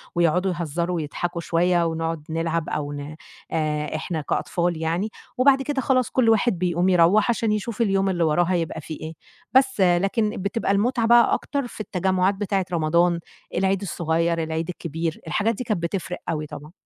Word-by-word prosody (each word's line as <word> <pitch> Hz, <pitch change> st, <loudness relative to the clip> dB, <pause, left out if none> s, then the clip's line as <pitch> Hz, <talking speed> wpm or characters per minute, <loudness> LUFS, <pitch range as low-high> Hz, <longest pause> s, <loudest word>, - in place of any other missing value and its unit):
ويقعدوا 175 Hz, +3 st, +2 dB
يهزروا 170 Hz, +2 st, -2 dB
ويضحكوا 170 Hz, +2 st, -3 dB
شوية 175 Hz, +1 st, +2 dB
ونقُعد 165 Hz, -1 st, -2 dB
نلعب 165 Hz, 0 st, -1 dB
أو 145 Hz, -1 st, -3 dB
ن 145 Hz, +2 st, -7 dB, 0.4 s
آآ 150 Hz, -1 st, -1 dB
إحنا 160 Hz, 0 st, -3 dB
كأطفال 175 Hz, +3 st, -1 dB
يعني، 170 Hz, +7 st, -1 dB, 0.3 s
وبعد 270 Hz, +1 st, +5 dB
كده 270 Hz, -1 st, -1 dB
خلاص 255 Hz, -3 st, +2 dB
كُل 250 Hz, -3 st, +2 dB
واحد 225 Hz, -2 st, +3 dB
بيقوم 180 Hz, 0 st, +1 dB
يروّح 180 Hz, +5 st, +4 dB
عشان 230 Hz, -2 st, +1 dB
يشوف 215 Hz, +2 st, -2 dB
اليوم 195 Hz, -2 st, +2 dB
اللي 175 Hz, -2 st, 0 dB
وراه 160 Hz, +2 st, +3 dB
هيبقى 170 Hz, -3 st, -1 dB
في 155 Hz, -, -7 dB
إيه. 155 Hz, +1 st, -7 dB, 0.4 s
بس 260 Hz, -5 st, +3 dB
لكن 195 Hz, +5 st, +2 dB
بتبقى 200 Hz, +1 st, -1 dB
المُتعة 230 Hz, +3 st, +1 dB
بقى 235 Hz, 0 st, +6 dB
أكتر 280 Hz, -3 st, -2 dB
في 220 Hz, -, -8 dB
التجمُعات 185 Hz, 0 st, +1 dB
بتاعِة 195 Hz, -2 st, -1 dB
رمضان، 170 Hz, +1 st, +2 dB, 0.4 s
العيد 195 Hz, +1 st, +1 dB
الصغير، 165 Hz, -2 st, 0 dB
العيد 160 Hz, +1 st, -3 dB
الكبير. 165 Hz, -2 st, -4 dB
الحاجات 215 Hz, +7 st, +1 dB
دي 250 Hz, -, -4 dB
كانت 210 Hz, -8 st, -2 dB
بتفرِق 180 Hz, +1 st, -3 dB
أوي 155 Hz, -2 st, -2 dB
طبعًا. 150 Hz, +2 st, -10 dB
175 Hz, 165 wpm, -23 LUFS, 165-205 Hz, 0.4 s, بقى